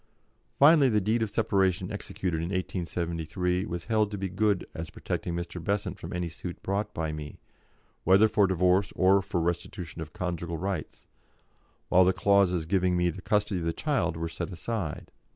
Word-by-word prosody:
Finally 145 Hz, -1 st, +7 dB
the 105 Hz, -2 st, +3 dB
deed 110 Hz, +4 st, +1 dB
of 110 Hz, -, 0 dB
separation 95 Hz, -3 st, +1 dB
executed 95 Hz, -4 st, -3 dB
in 80 Hz, -, -2 dB
1873 90 Hz, 0 st, -2 dB
was 85 Hz, -1 st, -5 dB
held 110 Hz, -2 st, +2 dB
to 105 Hz, -, -5 dB
be 95 Hz, 0 st, -3 dB
good 100 Hz, +1 st, +1 dB
as 80 Hz, 0 st, -6 dB
protecting 85 Hz, -, -4 dB
Mr. 85 Hz, 0 st, -5 dB
Besant 100 Hz, +3 st, -2 dB
from -, -, -7 dB
any 90 Hz, 0 st, -2 dB
suit 85 Hz, +2 st, -8 dB
brought 100 Hz, +2 st, -1 dB
by 80 Hz, -4 st, -2 dB
me, 75 Hz, -1 st, -7 dB, 0.7 s
whether 95 Hz, +4 st, +6 dB
for 105 Hz, -2 st, +3 dB
divorce 90 Hz, +1 st, +2 dB
or 95 Hz, +1 st, +4 dB
for 95 Hz, -2 st, -2 dB
restitution 85 Hz, 0 st, -3 dB
of 80 Hz, -1 st, -7 dB
conjugal 85 Hz, -4 st, -3 dB
rights, 95 Hz, -2 st, -4 dB, 0.8 s
while 95 Hz, -, +6 dB
the 95 Hz, +1 st, +4 dB
clauses 95 Hz, -5 st, +3 dB
giving 90 Hz, +1 st, +2 dB
me 90 Hz, 0 st, +2 dB
the 95 Hz, -, -9 dB
custody 105 Hz, -2 st, +1 dB
of 85 Hz, -, -4 dB
the 85 Hz, -, 0 dB
child 90 Hz, -, 0 dB
were 85 Hz, 0 st, -2 dB
set 80 Hz, +3 st, -5 dB
aside. 90 Hz, -2 st, -4 dB
90 Hz, 175 wpm, -28 LUFS, 85-100 Hz, 0.8 s, Finally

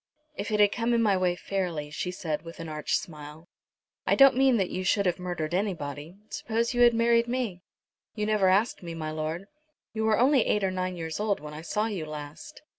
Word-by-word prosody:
"If 205 Hz, -, -4 dB
it 210 Hz, -1 st, 0 dB
had 205 Hz, -1 st, +6 dB
come 235 Hz, +1 st, 0 dB
in 230 Hz, -, +3 dB
my 205 Hz, -3 st, +3 dB
way 180 Hz, -1 st, +1 dB
fairly," 175 Hz, -6 st, -3 dB
she 180 Hz, -, -3 dB
said 160 Hz, -4 st, -3 dB
with 165 Hz, 0 st, -11 dB
an 165 Hz, -, -6 dB
arch 155 Hz, -1 st, -1 dB
smile. 150 Hz, 0 st, -9 dB, 0.6 s
"I -, -, +4 dB
don't 275 Hz, -2 st, +7 dB
mean 265 Hz, -2 st, +4 dB
that 190 Hz, -3 st, 0 dB
you 185 Hz, -, -3 dB
should 200 Hz, +2 st, +2 dB
have 180 Hz, 0 st, +1 dB
murdered 175 Hz, -3 st, -3 dB
anybody. 165 Hz, -5 st, -3 dB
Suppose 230 Hz, +2 st, -1 dB
you 245 Hz, -, +1 dB
had 240 Hz, -1 st, +6 dB
married 235 Hz, 0 st, +3 dB
me?" 235 Hz, -8 st, -2 dB, 0.5 s
"You 210 Hz, -1 st, -1 dB
never 210 Hz, -3 st, +3 dB
asked 205 Hz, +5 st, +2 dB
me, 170 Hz, -2 st, -6 dB
my 155 Hz, -1 st, -4 dB
lord." 155 Hz, +4 st, -3 dB, 0.5 s
"You 220 Hz, 0 st, -1 dB
were 220 Hz, -1 st, +3 dB
only 260 Hz, 0 st, +5 dB
eight 210 Hz, -, +1 dB
or 190 Hz, -, +1 dB
nine 185 Hz, -1 st, -3 dB
years 160 Hz, 0 st, -4 dB
old 210 Hz, -1 st, 0 dB
when 150 Hz, 0 st, -9 dB
I 150 Hz, -, -7 dB
saw 210 Hz, +6 st, -1 dB
you 195 Hz, -8 st, -3 dB
last." 150 Hz, -, -9 dB
185 Hz, 220 wpm, -27 LUFS, 160-220 Hz, 0.6 s, don't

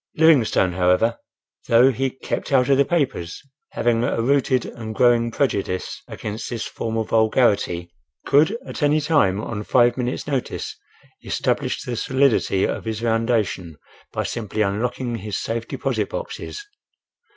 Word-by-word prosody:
Livingstone, 135 Hz, -, +4 dB
however, 90 Hz, +6 st, +2 dB, 0.5 s
though 120 Hz, +3 st, +6 dB
he 135 Hz, +2 st, -1 dB
"kept 130 Hz, -, -5 dB
out 130 Hz, -2 st, +3 dB
of 135 Hz, -, +5 dB
the -, -, +7 dB
papers," 135 Hz, -, -1 dB, 0.3 s
having 120 Hz, 0 st, +1 dB
a 120 Hz, -, 0 dB
rooted 130 Hz, +1 st, +2 dB
and 110 Hz, -2 st, -7 dB
growing 120 Hz, -1 st, +4 dB
prejudice 100 Hz, -7 st, -2 dB
against 110 Hz, +1 st, -6 dB
this 120 Hz, -2 st, -4 dB
form 115 Hz, 0 st, -4 dB
of 110 Hz, -, -2 dB
vulgarity, 105 Hz, -6 st, +2 dB, 0.3 s
could 155 Hz, +10 st, +3 dB
at -, -, -7 dB
any 145 Hz, +1 st, +3 dB
time, 145 Hz, -, +2 dB
on 110 Hz, -1 st, -4 dB
five 120 Hz, +2 st, +3 dB
minutes' 125 Hz, 0 st, -2 dB
notice, 135 Hz, -4 st, -3 dB, 0.5 s
establish -, -, -1 dB
the 120 Hz, -, -4 dB
solidity 130 Hz, -6 st, +2 dB
of -, -, -3 dB
his 110 Hz, -1 st, -3 dB
foundation 115 Hz, -8 st, 0 dB, 0.3 s
by -, -, -2 dB
simply 110 Hz, -2 st, -2 dB
unlocking 120 Hz, +4 st, -2 dB
his 105 Hz, 0 st, -4 dB
safe 115 Hz, 0 st, -3 dB
deposit -, -, -2 dB
boxes. -, -, -6 dB
115 Hz, 140 wpm, -22 LUFS, 110-130 Hz, 0.5 s, the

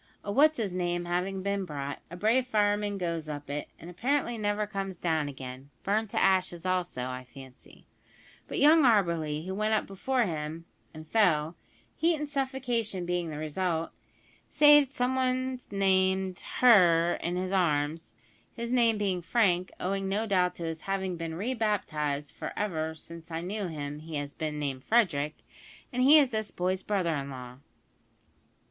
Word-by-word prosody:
A 205 Hz, -, -3 dB
`what's 305 Hz, +5 st, +5 dB
his 205 Hz, -6 st, -2 dB
name' 175 Hz, -1 st, -1 dB
having 185 Hz, +2 st, -2 dB
been 200 Hz, 0 st, -1 dB
brought, 145 Hz, -4 st, -5 dB
a 175 Hz, -, -8 dB
brave 235 Hz, +6 st, +2 dB
fireman 205 Hz, -2 st, +1 dB
goes 170 Hz, -4 st, -3 dB
up 145 Hz, -1 st, -6 dB
it, 145 Hz, +1 st, -4 dB
and 165 Hz, -, -12 dB
apparently 240 Hz, +7 st, -1 dB
never 210 Hz, -1 st, -1 dB
comes 195 Hz, -3 st, -4 dB
down 160 Hz, -4 st, 0 dB
again 130 Hz, 0 st, -9 dB
(burned 215 Hz, +2 st, 0 dB
to -, -, -1 dB
ashes 185 Hz, -2 st, +2 dB
also, 180 Hz, -8 st, -1 dB
I 130 Hz, 0 st, -5 dB
fancy); 130 Hz, +1 st, -15 dB, 0.6 s
but -, -, -5 dB
young 310 Hz, +3 st, +6 dB
Auberly, 170 Hz, -, +2 dB
who 190 Hz, -, -4 dB
went 215 Hz, +2 st, +1 dB
up -, -, 0 dB
before 245 Hz, +6 st, 0 dB
him, 160 Hz, -3 st, -4 dB, 0.3 s
and 155 Hz, 0 st, -11 dB
fell 165 Hz, -5 st, +2 dB, 0.4 s
heat 335 Hz, +1 st, +2 dB
and 300 Hz, -1 st, -4 dB
suffocation 250 Hz, -9 st, -2 dB
being 175 Hz, -1 st, -1 dB
the 150 Hz, -, -6 dB
result 160 Hz, +2 st, -2 dB, 0.6 s
saved 295 Hz, -2 st, +6 dB
some 255 Hz, -2 st, 0 dB
one 255 Hz, 0 st, 0 dB
named 190 Hz, -1 st, +2 dB, 0.2 s
`her' 175 Hz, -8 st, +6 dB
in 175 Hz, +1 st, -2 dB
his 185 Hz, +1 st, -2 dB
arms; 160 Hz, -3 st, 0 dB, 0.4 s
his 235 Hz, 0 st, -4 dB
name 235 Hz, -3 st, +3 dB
being 195 Hz, -3 st, -1 dB
Frank 185 Hz, -2 st, +1 dB
(owing 195 Hz, +1 st, -1 dB
no 210 Hz, +3 st, 0 dB
doubt 185 Hz, -4 st, +1 dB
to 170 Hz, -, -7 dB
his 165 Hz, -1 st, -4 dB
having 190 Hz, -1 st, -2 dB
been 165 Hz, -1 st, -5 dB
re 220 Hz, +9 st, -2 dB
baptised, 150 Hz, -, -1 dB
for -, -, -6 dB
ever 160 Hz, -6 st, -2 dB
since 165 Hz, +1 st, -11 dB
I 165 Hz, 0 st, -3 dB
knew 200 Hz, +2 st, -3 dB
him 145 Hz, -2 st, -5 dB
he 160 Hz, 0 st, -8 dB
has 145 Hz, -1 st, -4 dB
been 155 Hz, -1 st, -4 dB
named 135 Hz, -3 st, -3 dB
Frederick), 160 Hz, -10 st, +2 dB, 0.6 s
and 250 Hz, -, 0 dB
he 285 Hz, +4 st, +8 dB
is 280 Hz, -4 st, +4 dB
this 220 Hz, -1 st, -2 dB
boy's 185 Hz, +1 st, -1 dB
brother 185 Hz, -5 st, 0 dB
in 140 Hz, -2 st, -3 dB
law!" 125 Hz, -1 st, -9 dB
185 Hz, 170 wpm, -29 LUFS, 160-215 Hz, 0.6 s, he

